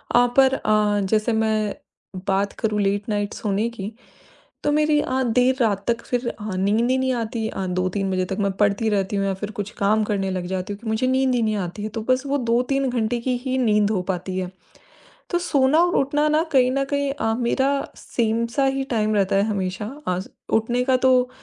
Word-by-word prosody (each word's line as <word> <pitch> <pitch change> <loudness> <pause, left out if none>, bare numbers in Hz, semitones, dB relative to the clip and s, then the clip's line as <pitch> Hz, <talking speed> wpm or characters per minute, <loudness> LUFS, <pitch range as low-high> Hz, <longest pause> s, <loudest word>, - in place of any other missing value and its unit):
अ, 245 - +6
पर 265 0 +6
अ, 210 -4 +2
जैसे 220 +1 +1
मैं 220 -1 0 0.5
बात 200 +1 +1
करूँ 210 -2 0
लेट 200 +2 0
नाइट 205 -1 -1
सोने 210 +2 -1
की, 210 -3 -6 0.7
तो 295 - +2
मेरी 300 0 +3
आ 260 -1 -1
देर 250 +2 +3
रात 205 -4 +1
तक 230 0 +1
फिर 245 0 -2
अ, 210 -4 -6
नींद 205 +6 +1
ही 260 - +2
नहीं 260 0 +1
आती 230 -1 -2
अ, 190 - -4
2-3 185 +2 -1
बजे 185 -1 0
तक। 190 +1 -4
मैं 200 -1 +1
पढ़ती 205 +2 +2
रहती 200 -1 0
हूँ 195 - 0
या 195 - 0
फिर 205 +3 -5
कुछ 205 +1 -3
काम 215 +2 +2
करने 200 -2 -1
लग 185 -1 -3
जाती 185 +2 -3
हूँ, 200 - -9
क्योंकि 225 - -10
मुझे 220 +3 0
नींद 260 0 +2
ही 240 - +1
नहीं 215 -1 +1
आती 190 +4 -7
है। 215 - -3
तो - - -1
बस 255 +2 +2
वो 280 +1 0
2-3 265 +3 +1
घंटे 240 -1 -1
की 255 +1 0
ही 260 0 0
नींद 210 -4 +3
हो 195 -4 0
पाती 185 +1 -4
है। 185 -1 -3 0.8
तो 350 - +1
सोना 290 -3 +3
और 350 0 +1
उठना 295 +2 +2
ना 310 +2 +3
कहीं 255 -3 +4
न 275 +1 +1
कहीं 280 -1 +1
अ, 225 -5 -1
मेरा 265 +3 +1 0.3
सेम 230 0 -1
सा 275 -1 +3
ही 270 0 0
टाइम 215 -1 +1
रहता 195 -1 +2
है 195 - +4
हमेशा। 190 -1 -2 0.2
अज़ 185 +1 -2 0.3
उठने 240 +3 -1
का 260 0 +3
तो 250 -1 +4
220 Hz, 220 wpm, -23 LUFS, 200-255 Hz, 0.8 s, अ